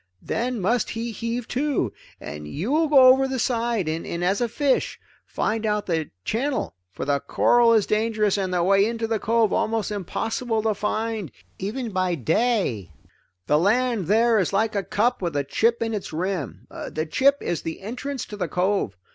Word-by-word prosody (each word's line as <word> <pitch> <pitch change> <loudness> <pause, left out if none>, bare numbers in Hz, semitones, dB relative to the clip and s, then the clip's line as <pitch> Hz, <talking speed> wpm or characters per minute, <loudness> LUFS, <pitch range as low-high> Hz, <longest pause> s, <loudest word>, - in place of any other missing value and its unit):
Then 245 0 -2
must 230 +5 +1
he 230 +1 -4
heave 230 +2 -4
to, 265 - 0 0.3
and 75 0 -7
you 170 - -3
will 315 +2 +3
go 270 -3 +7
over 265 +1 +5
the 265 0 -3
side, 235 -5 0
and 165 +2 -3
as 195 +6 +1
a 240 - +1
fish, 275 +2 0 0.3
find 220 0 -1
out 210 -1 0
the 160 -4 -1 0.2
channel, 260 +4 -1 0.2
for 90 - -6
the 140 0 +1
coral 240 +8 +3
is 220 -3 +4
dangerous 215 -1 +1
and 190 -2 -1
the 175 -1 +1
way 195 +2 +4
into 230 +1 -1
the 225 -1 -1
cove 225 0 +2
almost 220 -2 0
impossible 220 +3 -2
to 220 -1 +2
find 215 - -2 0.3
even 225 +4 -3
by 185 -2 0
day. 160 - 0 0.5
"The 150 +1 +3
land 225 0 +1
there 225 +2 +4
is 185 - 0
like 215 +3 +1
a 200 - 0
cup 215 +5 0
with 170 -4 -2
a 145 - +1
chip 230 +12 +1
in 225 0 -2
its 205 -3 -4
rim; 170 - -3 0.2
the 155 0 -3
chip 275 - +3
is 170 - -2
the 165 - -6
entrance 250 +5 -5
to 210 - -8
the 190 - -2
cove. 180 - 0
215 Hz, 185 wpm, -24 LUFS, 185-235 Hz, 0.5 s, go